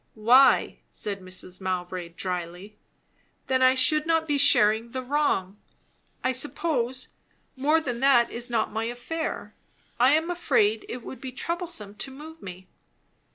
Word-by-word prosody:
"Why?" 245 +5 +4
said 200 -2 -6
Mrs. 185 0 -7
Mowbray 180 -1 -3
dryly. 180 +3 -5 0.7
"Then 260 -1 +1
I 260 0 +5
should 305 +4 +3
not 325 -1 +1
be 295 - +1
sharing 220 -3 +4
the 260 0 -3
wrong. 250 -9 0 0.7
I 255 - +2
suppose, 260 -2 -2 0.5
more 295 +5 +2
than 250 -6 -4
that 260 -3 +4
is 240 +1 -4
not 230 -2 0
my 225 +1 -2
affair. 245 +8 -5 0.5
I 255 +3 +5
am 320 +3 +1
afraid 225 -11 +1
it 245 0 -6
would 250 0 -9
be 260 - -6
troublesome 330 - -4
to 210 +6 -6
move 310 +4 -11
me." 185 0 -10
245 Hz, 145 wpm, -26 LUFS, 210-285 Hz, 0.7 s, I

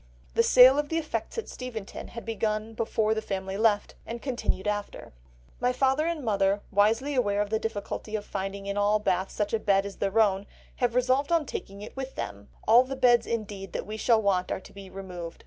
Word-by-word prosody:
The - - +4
sale 255 +3 +7
of 295 -1 -2
the 325 - 0
effects 325 +8 -3
at 455 - -3
Steventon 235 -5 -7
had 230 - -9
begun 220 0 -2
before 220 -1 0
the 220 - -2
family 190 -2 -4
left, 210 -1 +2
and 235 +1 -6
continued 240 -6 -2
after. 205 - -4 0.5
"My 245 +1 +2
father 270 +4 +2
and 330 -6 -2
mother, 200 -1 +2
wisely 225 +8 +2
aware 205 -6 +1
of 205 0 -1
the 220 - +1
difficulty 215 0 -4
of 210 -1 -3
finding 195 0 -4
in 200 0 -3
all 205 +1 +3
Bath 190 -2 0
such 210 0 -2
a 225 - +2
bed 200 -2 +2
as 200 - -7
their 200 +3 +1
own, 200 -2 +2 0.3
have 245 -1 0
resolved 255 +4 +2
on 330 -3 +3
taking 200 -5 -6
it 215 - -10
with 265 0 -6
them; 100 0 -6 0.2
all 235 +3 +7
the 265 +1 -5
beds, 245 -2 +4
indeed, 205 -4 -4
that - - -3
we 215 +2 -6
shall 225 +1 +3
want 185 -2 +1
are - - -1
to - - -15
be 195 -1 -10
removed.... 180 -3 -7
215 Hz, 215 wpm, -27 LUFS, 200-250 Hz, 0.5 s, sale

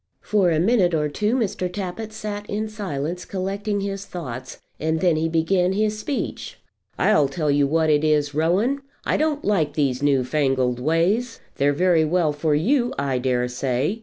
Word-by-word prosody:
For 200 -4 +2
a 160 -2 +2
minute 185 -2 +3
or 150 -1 0
two 210 - 0
Mr. 190 -7 -1
Tappitt 200 +3 -5
sat 210 -1 -6
in 215 +2 -2
silence 180 -5 -4
collecting 200 +2 -3
his 195 0 -4
thoughts, 130 -10 -7 0.2
and 160 +1 0
then 175 -1 +3
he 160 +1 0
began 180 +3 +2
his 215 +1 0
speech. 290 - -4 0.4
"I'll 150 -9 +3
tell 150 +1 -1
you 140 0 +3
what 160 +1 +2
it 150 0 +3
is, 150 -2 +2
Rowan, 190 - +1 0.2
I - - +1
don't 305 -1 0
like 165 -8 +1
these 135 -4 0
new 140 -3 +3
fangled 130 -2 0
ways. 175 - +1 0.2
They're 140 +1 +3
very 170 +2 +3
well 160 -1 +1
for 150 0 0
you, 245 - +2
I 135 -2 0
dare 125 -1 0
say. 130 - -1
165 Hz, 175 wpm, -23 LUFS, 145-205 Hz, 0.4 s, minute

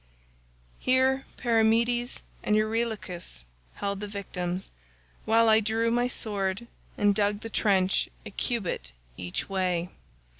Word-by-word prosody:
"Here 260 +1 +3
Perimedes 235 +1 +2 0.2
and 210 - +2
Eurylochus 215 - -2 0.3
held 200 -1 -2
the 210 - -4
victims, 185 -2 -4 0.5
while 225 +1 +5
I 220 0 +7
drew 225 +2 +1
my 240 +1 +2
sword 205 -3 -1 0.3
and 205 0 +4
dug 205 0 +1
the 225 - -7
trench 190 -3 +2 0.2
a - - -7
cubit 180 - -2 0.2
each 90 +4 -3
way. 180 -3 0
210 Hz, 115 wpm, -28 LUFS, 190-230 Hz, 0.5 s, I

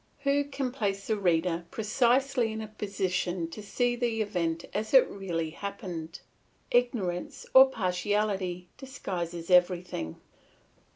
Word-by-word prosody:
Who 280 0 +2
can 275 -2 -3
place 200 -6 -2
the 220 - +1
reader 175 -3 +1
precisely 240 +3 +2
in 220 - -4
a 220 - -5
position 185 -4 -2
to 215 - -7
see 240 +4 0
the 235 -2 0
event 170 -5 -2
as 215 +5 -1
it 260 - +8
really 170 -5 -3
happened? 175 -3 -6 0.5
Ignorance 225 -8 0
or 265 0 +9
partiality 190 -3 -1
disguises 180 -10 -5
everything. 180 - +2
200 Hz, 120 wpm, -29 LUFS, 180-240 Hz, 0.5 s, or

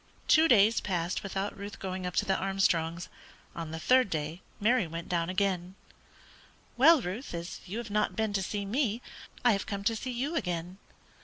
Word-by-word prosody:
Two 320 0 +6
days 225 -3 +5
passed 175 -2 -1
without 195 +1 -3
Ruth 200 +1 -7
going 185 -1 -4
up 180 - -5
to - - +2
the 190 - +2
Armstrongs'; 180 -3 0 0.5
on 165 -2 -5
the 160 - -5
third 255 +3 +4
day 155 +2 -3 0.2
Mary 235 0 +3
again 160 - -11
went 165 0 -6
down. 180 +1 0 1.0
"Well, 280 +2 +6
Ruth, 190 +3 -5
as 170 +1 -6
you 195 +5 -5
have 230 -3 -5
not 210 +1 +1
been 220 -2 -1
to 195 - +1
see 200 +1 -3
me, 230 +1 0 0.5
I 240 - +7
have 200 -2 -1
come 200 -1 -4
to 225 +3 +1
see 255 +4 -5
you 260 +7 -2
again." 180 - -3
195 Hz, 185 wpm, -30 LUFS, 180-225 Hz, 1.0 s, I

